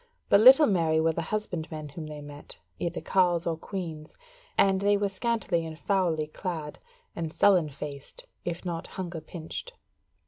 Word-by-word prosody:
But 200 - +7
little 265 +7 +9
merry 165 - +2
were 165 +1 +3
the 170 - -2
husbandmen 160 -5 -4
whom 155 +2 -7
they 150 -1 -7
met, 145 0 -11 0.2
either 170 0 -2
carles 175 -3 +2
or 165 - 0
queans, 160 -3 -6 0.4
and 195 -1 +4
they 205 0 +4
were 200 0 0
scantily 195 -4 -1
and 160 -1 -7
foully 175 -5 +1
clad, 155 -1 -5 0.4
and 165 -2 -3
sullen 180 -4 +4
faced, 140 0 -8 0.2
if 175 +1 -4
not 170 -2 -3
hunger 175 -3 -5
pinched. 170 - -7
170 Hz, 160 wpm, -28 LUFS, 155-190 Hz, 0.4 s, little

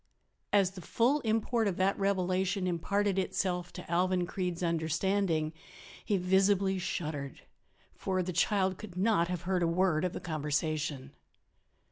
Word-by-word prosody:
As 195 -3 +4
the 190 -1 -10
full 245 - +2
import 225 -1 +1
of 190 - -1
that 190 +1 +2
revelation 190 -1 0
imparted 195 +3 0
itself 180 -1 -1
to 180 - -7
Alvan 180 +1 +1
Creede's 180 -1 -3
understanding 165 0 0 0.5
he 205 - +1
visibly 190 +1 +2
shuddered. 150 -6 -4 0.5
For 185 -1 -1
the 180 +1 -4
child 190 +1 +1
could 190 -5 -9
not 190 -3 +3
have 180 -1 -4
heard 185 0 0
a 170 - +3
word 170 -1 +2
of 180 - -1
the - - -4
conversation. 150 -3 -2
185 Hz, 140 wpm, -31 LUFS, 170-195 Hz, 0.5 s, As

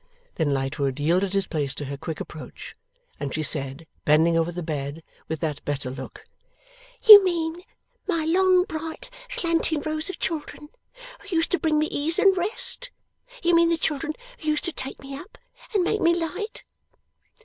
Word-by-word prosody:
Then, 160 -3 0
Lightwood 135 0 -1
yielded 180 +6 +1
his 195 -1 +1
place 145 -4 -2
to 145 - -5
her 140 +1 -5
quick 155 +2 -6
approach, 155 - -9 0.5
and 140 - -3
she 155 - -2
said, 140 +1 -1 0.2
bending 160 +3 +4
over 165 +1 +1
the 175 0 -5
bed, 150 0 -4 0.2
with 160 -1 -4
that 150 -3 -3
better 140 -3 -3
look: 130 - -9 0.8
'You 420 -3 +12
mean 335 -3 -1 0.5
my 335 -5 0
long 365 +2 +4
bright 320 -2 -6 0.2
slanting 335 -9 +1
rows 310 +2 -2
of 375 - -5
children, 300 -1 -4 0.5
who 405 -3 -6
used 325 0 +1
to 360 - +2
bring 315 -2 +1
me 305 - +3
ease 310 +2 -1
and 390 -1 +5
rest? 420 +6 0 0.5
You 345 0 +3
mean 335 0 +5
the 335 - +2
children 305 0 -1 0.3
who 310 - -8
used 305 -1 +1
to 345 - -1
take 265 0 -6
me 275 0 -8
up, 320 +9 -11 0.3
and 405 -5 +2
make 425 +4 0
me 340 0 +4
light? 365 +6 -4
305 Hz, 175 wpm, -25 LUFS, -, 0.8 s, You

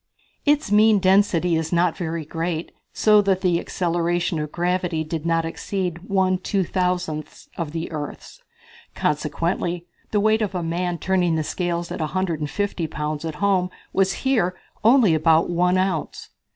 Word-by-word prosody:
Its 295 -7 +2
mean 215 +1 +6
density 185 -3 +3
is 160 0 -2
not 175 -1 +2
very 165 -3 -4
great 165 +1 -3 0.2
so 210 -1 +5
that 195 -2 +1
the 175 -3 +2
acceleration 175 -1 -1
of 150 -1 -4
gravity 175 -2 -1
did 160 0 -4
not 165 -1 +1
exceed 175 +1 -3
one 190 -1 +2
two 195 +1 0
thousandths 180 -4 -2
of 165 -4 -4
the 165 +1 -4
earth's. 150 -2 -7 0.5
Consequently 170 +3 -1 0.2
the 210 - +1
weight 220 +2 +3
of 200 -3 -2
a 175 - -1
man 175 +1 -1
turning 180 -2 +1
the 160 - 0
scales 175 +1 -2
at - - -4
150 170 +2 -2
pounds 150 0 -4
at 160 -2 -4
home 190 0 +1 0.2
was 195 0 +1
here 205 -9 +2 0.3
only 225 -5 +5
about 160 +2 +3
one 180 +1 +2
ounce. 185 -4 -2
175 Hz, 150 wpm, -23 LUFS, 165-190 Hz, 0.5 s, mean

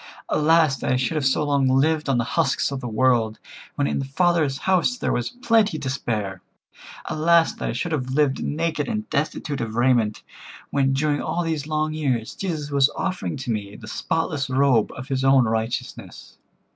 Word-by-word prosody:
Alas! 155 -2 +3
that - - -2
I - - +3
should 130 +5 0
have 150 -4 +1
so 135 - +1
long 140 -2 +2
lived 150 +3 +2
on 135 - +2
the 120 - +1
husks 140 -4 +1
of 140 - -3
the 125 - -4
world, 115 -1 +2 0.4
when 145 - 0
in - - -1
the 135 - -2
Father's 155 -1 +1
house 190 +6 +2
there - - -1
was 120 -1 -1
plenty 225 -7 +1
and 145 - -8
to 130 - -1
spare. 105 -8 -3 0.6
Alas! 165 +1 +3
that - - -4
I - - -2
should 170 - -3
have 130 -5 -2
lived 135 0 +1
naked 160 0 -1
and 215 -2 -3
destitute 145 -1 -2
of 110 -1 -4
raiment, 120 -3 +2 0.5
when 135 -1 +2
during 145 +1 0
all 170 +2 -2
these 160 -3 -2
long 155 0 -1
years 130 -7 -1
Jesus 155 -6 -4
was 140 0 +4
offering 185 -5 -3
to 130 -2 -4
me 105 -2 -4
the 110 - -11
spotless 145 +2 -2
robe 130 -4 +3
of 130 +1 -8
His 135 -1 -1
own 135 -2 +5
righteousness. 110 +1 -4
140 Hz, 195 wpm, -23 LUFS, 130-160 Hz, 0.6 s, own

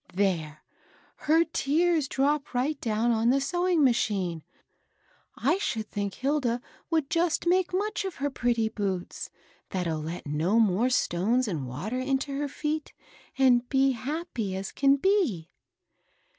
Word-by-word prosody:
There 165 -6 -1 0.6
I - - -19
her 320 +2 +5
tears 325 0 +1
drop 280 0 0
right 275 +4 0
down 225 +1 +1
on 230 +1 +2
the 270 +2 +4
sewing 350 +2 +1
machine 195 - +1 0.9
I 275 - +1
I 345 - +3
should 220 - -3
think 200 -1 -3
Hilda 265 -3 0 0.3
would 320 -4 +1
just 335 +2 0
make 360 +1 +2
much 405 +3 -1
of 385 -2 -4
her 285 +1 -2
pretty 240 -3 +1
boots, 195 -5 -4 0.4
that'll 170 -4 -2
let 165 +3 -6
no 160 +9 +1
more 220 +3 +3
stones 235 +2 +1
and 155 -10 -3
water 185 - -4
into 270 +1 -1
her 290 +1 -1
feet, 300 +2 -3 0.4
and 250 -2 +4
be 270 0 +3
happy 250 - -4
as 190 +1 -4
can 275 0 +4
be." 280 - +1
255 Hz, 145 wpm, -27 LUFS, 200-300 Hz, 0.9 s, her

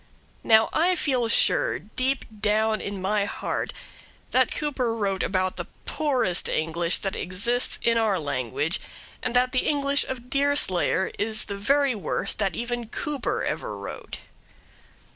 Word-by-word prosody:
Now 220 -1 +5
I 355 +3 +3
feel 260 -7 +1
sure, - - +3
deep 255 +5 -2
down 215 +1 +1
in 200 -2 -5
my 205 +1 +1
heart, - - -3 0.6
that 255 0 +3
Cooper 265 -6 -1
wrote 195 -4 -1
about 185 -1 0
the - - -4 0.2
poorest 260 - +1
English 165 +2 +1
that 195 - -1
exists 200 +7 +1
in 230 0 +3
our 215 -4 +2
language, 145 - -2 0.4
and 250 -1 -2
that 250 +1 +3
the 255 - 0
English 285 -1 +2
of 250 -1 -7
Deerslayer 275 -10 +2
is 215 +1 +1
the 200 - -5
very 275 +6 +2
worst 200 -1 -2
that 195 -4 0
even 240 0 -3
Cooper 285 +4 -2
ever - - -3
wrote. - - -7
225 Hz, 145 wpm, -25 LUFS, 195-260 Hz, 0.6 s, Now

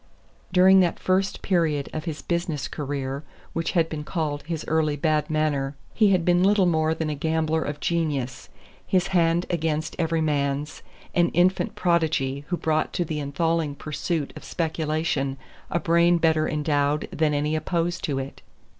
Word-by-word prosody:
During 185 +1 +6
that 175 -2 +2
first 190 +1 0
period 160 -6 +1
of 155 +1 -4
his 155 -3 -5
business 170 -5 -2
career 140 -1 -4 0.3
which 165 0 -2
had 165 -3 +3
been 155 -2 -5
called 150 -3 -2
his 165 -2 -3
early 155 -2 +1
bad 155 0 0
manner 150 -3 0 0.2
he 215 -3 +4
had 185 -4 +2
been 175 0 +4
little 195 0 +4
more 160 -2 +2
than 160 -1 -2
a - - -1
gambler 160 +1 0
of 145 -1 -4
genius, 145 -7 -2 0.4
his 185 0 +1
hand 170 -1 +2
against 160 -2 -1
every 165 -1 +1
man's, 145 -1 -1 0.3
an 175 -1 +3
infant 180 +2 +2
prodigy 150 -5 0
who 175 - -1
brought 155 -1 0
to 175 - 0
the 155 -1 -3
enthralling 150 +1 -1
pursuit 155 +1 -3
of - - -10
speculation 155 -4 -1 0.3
a 170 - 0
brain 170 +1 +4
better 160 -2 +2
endowed 150 -1 0
than 155 -1 +1
any 150 +2 0
opposed 170 +2 -1
to 145 -6 -1
it. 135 0 -6
160 Hz, 165 wpm, -25 LUFS, 150-170 Hz, 0.4 s, During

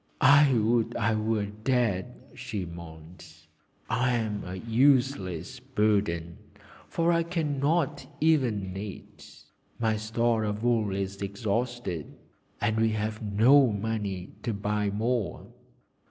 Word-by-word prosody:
'I 140 0 +6
would 115 +1 +1
I 115 +2 +1
were 110 -1 0
dead,' 110 +1 -1 0.2
she 120 -7 -5
moaned. 85 0 -11 0.6
'I 125 0 +1
am 110 -3 -2
a 90 +1 -6
useless 115 - +1
burden, 105 -9 0 0.5
for 165 +1 +1
I 170 - +3
cannot 155 -2 -1
even 120 - +1
knit. 100 +1 -9 0.3
My 110 -2 +1
store 110 +1 0
of 105 +1 -3
wool 115 -4 +2
is 100 0 -4
exhausted, 100 - -3 0.4
and 110 +1 0
we 110 0 +3
have 110 0 -3
no 115 +5 +5
money 100 -3 -3
to 115 -4 -2
buy 105 0 -1
more.' 110 0 -2
110 Hz, 115 wpm, -28 LUFS, 100-125 Hz, 0.6 s, I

